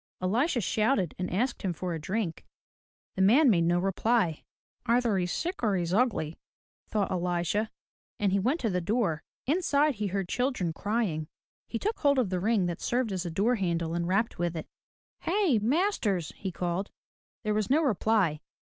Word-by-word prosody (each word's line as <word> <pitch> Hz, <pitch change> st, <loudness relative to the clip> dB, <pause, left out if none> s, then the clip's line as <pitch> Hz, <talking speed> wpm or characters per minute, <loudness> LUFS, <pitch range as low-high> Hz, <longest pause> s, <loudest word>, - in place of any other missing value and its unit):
Elisha 240 Hz, -, +1 dB
shouted 215 Hz, -, +1 dB
and 180 Hz, -, -2 dB
asked 240 Hz, +8 st, -1 dB
him 185 Hz, -3 st, -1 dB
for 175 Hz, +1 st, -4 dB
a 160 Hz, -, -4 dB
drink. 190 Hz, 0 st, -2 dB, 0.7 s
The 190 Hz, -, -1 dB
man 245 Hz, +8 st, +6 dB
made 170 Hz, -4 st, +3 dB
no 175 Hz, +1 st, +3 dB
reply. 195 Hz, -1 st, +1 dB, 0.4 s
"Either 235 Hz, -2 st, +2 dB
he's 180 Hz, -1 st, -1 dB
sick 350 Hz, +3 st, -3 dB
or 215 Hz, -4 st, +2 dB
he's 175 Hz, -1 st, -1 dB
ugly," 200 Hz, -9 st, +1 dB, 0.5 s
thought 210 Hz, -2 st, -1 dB
Elisha 180 Hz, +4 st, 0 dB, 0.5 s
and 200 Hz, -2 st, +2 dB
he 200 Hz, -, +2 dB
went 260 Hz, -, +1 dB
to 225 Hz, -, 0 dB
the 180 Hz, 0 st, 0 dB
door. 185 Hz, -5 st, 0 dB, 0.2 s
Inside, 300 Hz, -1 st, +2 dB
he 210 Hz, -3 st, -2 dB
heard 195 Hz, -1 st, -2 dB
children 245 Hz, -8 st, -1 dB
crying. 200 Hz, -7 st, -1 dB, 0.4 s
He 230 Hz, -, -3 dB
took 430 Hz, -, -2 dB
hold 280 Hz, -2 st, +3 dB
of 235 Hz, -7 st, +1 dB
the 185 Hz, -, 0 dB
ring 210 Hz, 0 st, +2 dB
that 175 Hz, -1 st, -3 dB
served 245 Hz, -2 st, 0 dB
as 185 Hz, -2 st, -2 dB
a -, -, -2 dB
door 205 Hz, +9 st, +1 dB
handle 170 Hz, -4 st, -1 dB
and 170 Hz, 0 st, -1 dB
rapped 200 Hz, +3 st, 0 dB
with 175 Hz, -1 st, -1 dB
it. 160 Hz, -, -5 dB, 0.5 s
"Hey, 350 Hz, -, +2 dB
masters!" 225 Hz, -, 0 dB
he 190 Hz, -, -4 dB
called. 175 Hz, +3 st, -2 dB, 0.5 s
There 215 Hz, -1 st, 0 dB
was 210 Hz, -1 st, 0 dB
no 305 Hz, +5 st, +4 dB
reply. 210 Hz, -, +2 dB
200 Hz, 180 wpm, -29 LUFS, 175-240 Hz, 0.7 s, man